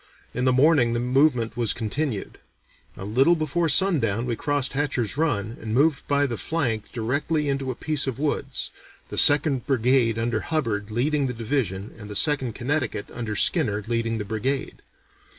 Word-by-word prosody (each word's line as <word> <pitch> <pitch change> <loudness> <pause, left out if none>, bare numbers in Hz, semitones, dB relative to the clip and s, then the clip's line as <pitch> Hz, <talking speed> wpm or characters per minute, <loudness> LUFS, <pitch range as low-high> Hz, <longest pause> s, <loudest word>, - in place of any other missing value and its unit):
In 125 +1 -1
the 130 - +4
morning 130 -2 +4
the 120 - 0
movement 125 -1 +2
was 120 -3 0
continued. 115 0 -3 0.6
A 95 - -6
little 135 +11 +3
before 160 +1 0
sundown 130 - +2
we 120 -2 -2
crossed 145 +2 -1
Hatcher's 135 -6 -1
Run 115 -8 -1
and 110 0 -3
moved 145 +2 +2
by 145 0 +2
the 120 -5 -4
flank 120 -10 -2
directly 145 +6 -1
into 135 -1 -1
a 130 - -3
piece 150 0 -1
of 130 - -3
woods, 140 -2 -2 0.4
the - - -6
Second 145 -2 +4
Brigade 125 -3 +2
under 115 0 -1
Hubbard 115 -11 -2
leading 140 +5 0
the 125 - -3
division 110 -5 -2
and 105 -1 -9
the 105 - -7
Second 130 -2 +1
Connecticut 125 -5 -2
under 115 -3 -4
Skinner 105 - +2
leading 115 0 -1
the 105 - -4
brigade. 115 +6 -3
125 Hz, 170 wpm, -24 LUFS, 115-145 Hz, 0.6 s, the